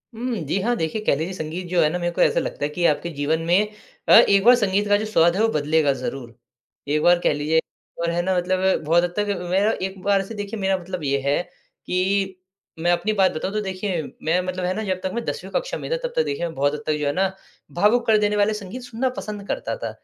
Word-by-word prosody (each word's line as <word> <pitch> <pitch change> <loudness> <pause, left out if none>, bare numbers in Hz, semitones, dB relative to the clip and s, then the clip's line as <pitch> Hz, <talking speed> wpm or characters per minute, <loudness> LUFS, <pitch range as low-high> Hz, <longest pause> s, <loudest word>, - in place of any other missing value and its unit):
उम, 240 +1 -3
जी 165 +7 0
हाँ। 240 +3 +1
देखिए, 160 +7 -2
कह - - +3
लीजिए 160 +6 -3
संगीत 175 +1 -5
जो 175 -1 +2
है 150 - +4
ना 180 +3 -3
मेरे 175 0 -1
को - - -1
ऐसा - - +4
लगता - - -4
है - - -2
कि 170 +3 -1
आपके 155 +3 +1
जीवन 150 +3 0
में 195 +5 +2 0.4
अ, - - +8
एक 200 -3 +7
बार 245 +2 +8
संगीत 205 -2 +1
का 205 0 +4
जो 215 - -3
स्वाद 175 -5 +3
है 210 - +1
वो 225 - +4
बदलेगा 150 0 +2
ज़रूर। 125 -3 -6 0.5
एक 150 +1 +1
बार 175 0 +5
कह - - +3
लीजिए 150 +2 +1 0.4
और 170 - 0
है 175 - 0
ना 185 +1 0
मतलब 185 0 +1
बहुत 170 +3 +3
हद 175 - -2
तक 205 0 0
अ, 180 -3 -3
मेरा 200 +4 +3
एक 190 0 -4
बार 200 -1 +3
से 220 +3 -8
देखिए 205 +1 -5
मेरा 195 -1 +1
मतलब 180 -2 -6
ये 140 0 +1
है, 140 +4 +1 0.4
कि 190 0 -1 0.4
मैं 175 +1 +2
अपनी 215 +5 +1
बात 190 -3 +3
बताऊँ 185 +6 -3
तो 215 - 0
देखिए 190 -2 -3 0.2
मैं 165 +3 +2
मतलब 185 0 -3
है 185 - 0
ना 220 - -3
जब 185 -3 -2
तक 190 - -2
मैं 235 0 -2
10वीं 465 - -5
कक्षा - - -2
में - - -7
था, - - +1
तब 485 - -12
तक 480 - +3
देखिए 190 - -3
मैं 165 -1 -6
बहुत 145 +2 +1
हद 150 - -5
तक 155 - +2
जो 145 - -1
है 145 - 0
ना, 190 +2 +1 0.4
भावुक 225 +7 +2
कर 220 -1 +5
देने 210 0 +1
वाले 205 +1 +2
संगीत 210 +4 -7
सुनना 245 +2 -2
पसंद 205 -1 -6
करता - - -3
था। - - -2
185 Hz, 265 wpm, -23 LUFS, 165-205 Hz, 0.5 s, अ